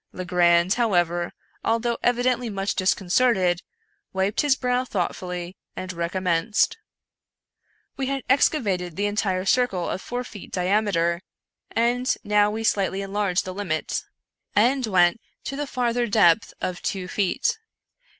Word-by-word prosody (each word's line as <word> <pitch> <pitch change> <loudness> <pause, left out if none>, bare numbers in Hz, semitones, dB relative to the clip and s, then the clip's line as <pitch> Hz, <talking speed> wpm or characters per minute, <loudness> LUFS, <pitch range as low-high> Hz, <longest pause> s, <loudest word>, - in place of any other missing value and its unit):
Legrand, 175 0 +3
however, 175 -7 +1 0.3
although 230 +1 +1
evidently 245 0 +1
much 195 -1 -2
disconcerted, 185 -1 +2 0.5
wiped 190 +2 +1
his 290 -2 +3
brow 250 -1 0
thoughtfully 180 -4 -3 0.2
and 185 0 -5
recommenced. 180 - 0 1.2
We 270 -1 -2
had 275 -1 -2
excavated 200 - +1
the 205 - -1
entire 200 -3 0
circle 195 -6 +1
of 190 - -3
four 245 +1 -4
feet 210 -5 -11
diameter, 180 -3 +1 0.5
and 240 +2 +1
now 210 -1 +3
we 220 +2 -3
slightly 195 -2 +1
enlarged 195 -2 0
the 185 - -5
limit, 180 -5 -2 0.5
and 250 +4 +3
went 180 0 +3 0.2
to 275 - -4
the 290 +1 -3
farther 245 -2 0
depth 205 -2 +4
of 180 -1 -3
two 190 -2 -3
feet. 210 - 0
200 Hz, 125 wpm, -24 LUFS, 180-240 Hz, 1.2 s, depth